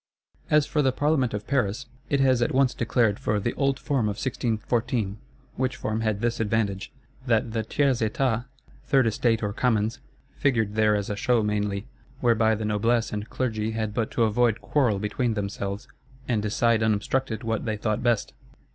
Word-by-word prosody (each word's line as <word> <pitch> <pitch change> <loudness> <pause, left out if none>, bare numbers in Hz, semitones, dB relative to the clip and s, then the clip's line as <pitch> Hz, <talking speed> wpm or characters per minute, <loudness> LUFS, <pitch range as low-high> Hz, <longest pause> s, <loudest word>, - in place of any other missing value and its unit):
As 150 -1 +4
for 150 - 0
the 135 -2 +3
Parlement 140 -2 +1
of 105 0 -4
Paris, 120 -7 0 0.2
it 140 - +2
has 130 -2 +3
at 120 - +1
once 135 -1 +3
declared 115 -3 +1
for 105 - 0
the 120 +4 -2
"old 135 -1 +1
form 135 -6 0
of 105 - -2
1614." 115 -3 -1 0.4
Which 130 0 0
form 110 +1 -2
had 110 -2 -1
this 120 0 0
advantage, 105 -3 -1 0.4
that 115 -1 +2
the 110 0 -1
Tiers 130 +3 +1
Etat, 115 +1 0 0.4
Third 135 -3 +3
Estate, 115 0 +1
or 105 -1 -1
Commons, 115 -2 0 0.4
figured 110 -7 +1
there 110 -1 +3
as 100 0 -2
a - - -2
show 115 +2 +2
mainly: 105 -1 -1 0.3
whereby 115 -2 +3
the 110 0 -4
Noblesse 110 +3 +1
and 105 +1 -4
Clergy 110 -3 -2
had 110 -2 -2
but 110 0 -1
to 120 - +1
avoid 115 +1 +2
quarrel 125 -8 +1
between 110 +3 -1
themselves, 100 0 -4 0.4
and 115 -4 +1
decide 110 +2 +2
unobstructed 110 +3 0
what 115 -1 -2
they 110 -2 -1
thought 110 +2 -1
best. 120 -3 +1
115 Hz, 175 wpm, -26 LUFS, 105-125 Hz, 0.4 s, As